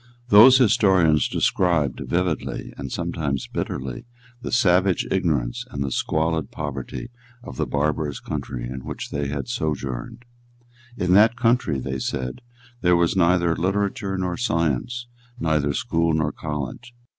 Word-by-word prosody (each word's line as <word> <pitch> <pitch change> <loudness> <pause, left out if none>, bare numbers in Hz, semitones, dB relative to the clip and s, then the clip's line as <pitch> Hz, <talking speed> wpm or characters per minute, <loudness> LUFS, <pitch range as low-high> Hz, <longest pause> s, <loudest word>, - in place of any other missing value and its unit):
Those 120 +6 +9
historians 95 - +4
described 80 -8 +1
vividly, 85 -2 -2
and 65 -2 -7
sometimes 80 -6 -2
bitterly, 65 - -5 0.3
the - - -5
savage 95 -5 +3
ignorance 75 -11 0
and 70 - -3
the 70 - -3
squalid 80 +4 0
poverty 75 - -6 0.3
of 65 - -9
the - - -1
barbarous 75 0 -1
country - - -5
in 65 +1 -7
which - - -6
they 70 0 -2
had 70 0 -4
sojourned. 75 - -4 0.7
In 90 0 +1
that 110 +4 +6
country, 115 - +1
they 65 0 -4
said, 65 - -3 0.4
there 90 -1 +4
was 85 +1 +2
neither 85 -2 +3
literature 100 +2 -1
nor 90 -2 -2
science, 85 - -1 0.3
neither 75 -3 +1
school 80 +3 0
nor 80 -1 0
college. 75 - -6
80 Hz, 135 wpm, -23 LUFS, 70-95 Hz, 0.7 s, Those